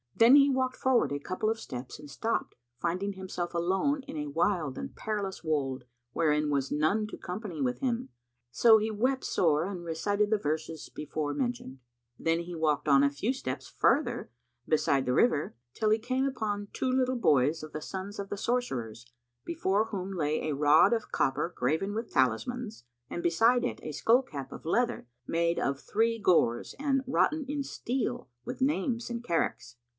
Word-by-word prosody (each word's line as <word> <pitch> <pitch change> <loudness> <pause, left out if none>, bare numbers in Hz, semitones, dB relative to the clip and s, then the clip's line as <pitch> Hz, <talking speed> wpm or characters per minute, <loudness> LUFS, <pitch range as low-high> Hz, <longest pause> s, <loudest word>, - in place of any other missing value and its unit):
Then 235 +4 +7
he 285 0 +7
walked 260 -1 0
forward 260 - +2
a 145 - -2
couple 185 +8 -2
of 225 0 -1
steps 125 - -7
and 150 -1 -11
stopped 225 +10 -2 0.2
finding 185 +7 -1
himself 185 -2 -5
alone 190 +12 +1
in 160 - -7
a 150 -1 -3
wild 165 -2 0
and 70 - -6
perilous 205 -4 -3
wold 135 -5 -1 0.3
wherein 150 +1 +1
was 140 -1 0
none 180 +9 +1
to - - -8
company 180 -2 -6
with 125 -2 0
him, 245 -2 -1 0.4
so 225 - +6
he 220 +1 -1
wept 255 +5 0
sore 160 -1 +2
and 185 -3 -5
recited 200 +6 0
the 215 - +3
verses 160 -3 -3
before 150 0 -3
mentioned. 240 - -3 0.4
Then 165 +1 +1
he 175 +1 -7
walked 155 -2 0
on 140 -1 +6
a 140 - +5
few 145 - -1
steps 265 - -5
farther 285 - +1 0.4
beside 140 -3 +2
the 125 - +1
river, 155 - +2 0.2
till 215 - 0
he 215 - +5
came 255 +4 0
upon 210 -6 -2
two 260 - -1
little 255 0 +1
boys 150 - +2
of 155 - -8
the 155 - -5
sons 195 +4 -6
of 200 -1 -5
the 205 - -4
sorcerers, 125 - -2 0.4
before 220 - 0
whom 195 -3 -5
lay 155 -2 -1
a 145 - -1
rod 150 +9 +5
of 225 -2 -2
copper 135 +6 0
graven 160 +11 0
with 225 +1 -4
talismans, 210 - 0 0.2
and 175 - -4
beside 230 +9 +4
it 245 - -2
a 155 - -4
skull 235 - +3
cap[FN#162] 140 - -7
of - - -10
leather, 230 - 0 0.2
made 170 0 +1
of 140 0 -1
three 230 +6 0
gores 165 - +2
and 275 -2 +1
wroughten 305 +3 +2
in 285 0 -2
steel 250 - -3 0.2
with - - -6
names 240 -3 0
and 235 0 -4
characts. 125 - -2
190 Hz, 180 wpm, -29 LUFS, 150-235 Hz, 0.4 s, Then